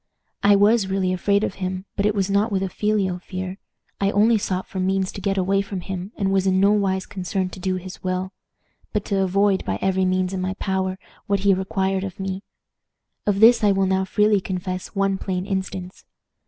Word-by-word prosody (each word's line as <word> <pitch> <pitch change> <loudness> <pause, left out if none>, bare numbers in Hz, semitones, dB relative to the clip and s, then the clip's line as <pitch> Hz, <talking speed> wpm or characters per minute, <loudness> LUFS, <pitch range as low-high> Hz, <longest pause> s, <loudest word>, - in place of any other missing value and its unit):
I 205 0 +6
was 205 +1 +4
really 190 -1 0
afraid 200 +3 +1
of - - -1
him, 185 +1 -3
but 200 0 +1
it 210 - 0
was 195 -2 +1
not 200 +3 +1
with 195 -1 0
a 190 - -2
filial 195 -2 0
fear. 185 +1 -6 0.4
I 195 - +2
only 215 +2 +4
sought 185 -1 -2
for 190 - -6
means 190 0 0
to 200 - -8
get 195 -1 0
away 195 +1 +2
from 195 -2 -5
him, 190 +1 -5
and 195 -2 0
was 195 0 +2
in 190 0 +3
no 200 +1 +5
wise 195 -2 +1
concerned 185 0 -3
to - - -8
do 185 0 -1
his 185 0 -8
will, 185 +1 -2 0.6
but 210 -2 -1
to 195 -1 0
avoid, 195 +1 +2
by - - -2
every 190 0 +1
means 185 0 0
in 185 - -2
my 185 +1 -2
power, 190 -1 -1 0.3
what 200 -2 +1
he 200 0 +4
required 190 0 -1
of 195 -1 -6
me. 190 0 -3 0.9
Of 200 0 +1
this 230 0 +7
I 205 - +5
will 195 0 +2
now 190 0 +1
freely 210 +1 +2
confess 185 +1 -4
one 195 -1 +1
plain 185 -1 -2
instance. 190 -1 -4
190 Hz, 210 wpm, -23 LUFS, 185-200 Hz, 0.9 s, this